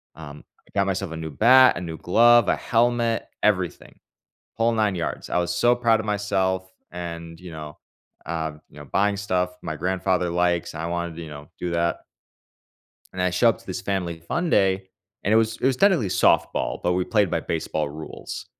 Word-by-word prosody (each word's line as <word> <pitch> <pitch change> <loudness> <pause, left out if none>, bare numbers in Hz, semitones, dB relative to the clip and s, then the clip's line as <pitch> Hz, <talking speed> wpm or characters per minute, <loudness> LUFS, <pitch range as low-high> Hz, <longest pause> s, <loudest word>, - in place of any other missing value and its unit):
um, 75 -2 -11 0.2
I - - -23
got 100 - +3
myself 95 -2 -2
a 80 - -5
new 80 -1 -5
bat, 130 - +6
a 90 - -4
new 80 -2 -6
glove, 120 +7 +5
a - - +3
helmet, 120 -1 +1 0.2
everything, 95 -5 -1 0.6
whole 115 +1 +2
9 105 -3 +1
yards. 85 - -4
I - - +1
was 90 0 -1
so 120 +6 +4
proud 115 -2 +2
of 110 - -6
myself 95 -2 -1 0.2
and, 85 -1 -7
you 90 -1 -10
know, 75 -2 -9 0.5
um, 80 -2 -4
you - - -20
know, 75 - -9
buying 100 +9 +1
stuff 90 -2 -1
my 80 - -4
grandfather 90 +2 0
likes, 85 0 0
and - - -5
I - - -3
wanted 85 -1 -3
to, 85 - -6
you 80 - -8
know, 75 0 -10
do 90 - -3
that. 85 0 0 1.1
And 95 - -3
I 90 - +2
show 90 +7 +3
up 115 - +1
to - - -20
this 90 -1 -4
Family 90 -4 -3
Fun 170 - -2
Day, 95 -1 +2 0.4
and 100 - 0
it - - +6
was 115 0 +2
it - - 0
was 130 -1 +2
technically 185 - +3
softball, - - +1
but 90 - +1
we 90 0 0
played 105 -4 +1
by - - 0
baseball 80 -2 -2
rules, 80 +2 -8
90 Hz, 205 wpm, -24 LUFS, 85-105 Hz, 1.1 s, bat